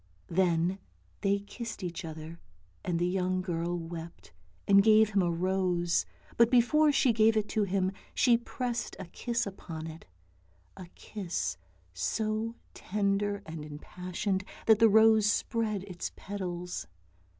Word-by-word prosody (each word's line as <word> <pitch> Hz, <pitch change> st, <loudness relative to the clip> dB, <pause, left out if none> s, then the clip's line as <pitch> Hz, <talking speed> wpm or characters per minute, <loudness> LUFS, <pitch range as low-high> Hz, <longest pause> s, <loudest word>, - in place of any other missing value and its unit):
" 90 Hz, 0 st, -35 dB
Then 175 Hz, +1 st, +1 dB, 0.4 s
they 200 Hz, 0 st, +2 dB
kissed 215 Hz, 0 st, -7 dB
each 175 Hz, 0 st, -4 dB
other, 160 Hz, +1 st, -8 dB, 0.4 s
and 175 Hz, -2 st, -1 dB
the 175 Hz, -, +1 dB
young 185 Hz, 0 st, 0 dB
girl 175 Hz, -1 st, -2 dB
wept, 165 Hz, -, -8 dB, 0.3 s
and 200 Hz, 0 st, +7 dB
gave 215 Hz, 0 st, +5 dB
him 200 Hz, -1 st, +3 dB
a 175 Hz, -, +1 dB
rose, 175 Hz, 0 st, +1 dB, 0.3 s
but 235 Hz, 0 st, +6 dB
before 290 Hz, +5 st, +4 dB
she 275 Hz, -4 st, +3 dB
gave 220 Hz, 0 st, +4 dB
it 210 Hz, -1 st, +1 dB
to 215 Hz, -2 st, +1 dB
him 190 Hz, -1 st, 0 dB, 0.2 s
she 245 Hz, -3 st, +5 dB
pressed 240 Hz, 0 st, -3 dB
a 190 Hz, -, -6 dB
kiss 235 Hz, +7 st, -2 dB
upon 170 Hz, -5 st, -7 dB
it, 160 Hz, -, -9 dB, 0.7 s
a 185 Hz, -, -9 dB
kiss 190 Hz, -5 st, -3 dB, 0.4 s
so 215 Hz, -, -1 dB, 0.2 s
tender 200 Hz, 0 st, -1 dB
and 160 Hz, -1 st, -7 dB
impassioned 180 Hz, +5 st, -3 dB, 0.2 s
that 220 Hz, -1 st, +6 dB
the 225 Hz, -, +7 dB
rose 220 Hz, 0 st, +6 dB
spread 215 Hz, -2 st, 0 dB
its 185 Hz, -3 st, -6 dB
petals. 180 Hz, -, -5 dB
195 Hz, 140 wpm, -30 LUFS, 175-220 Hz, 0.7 s, and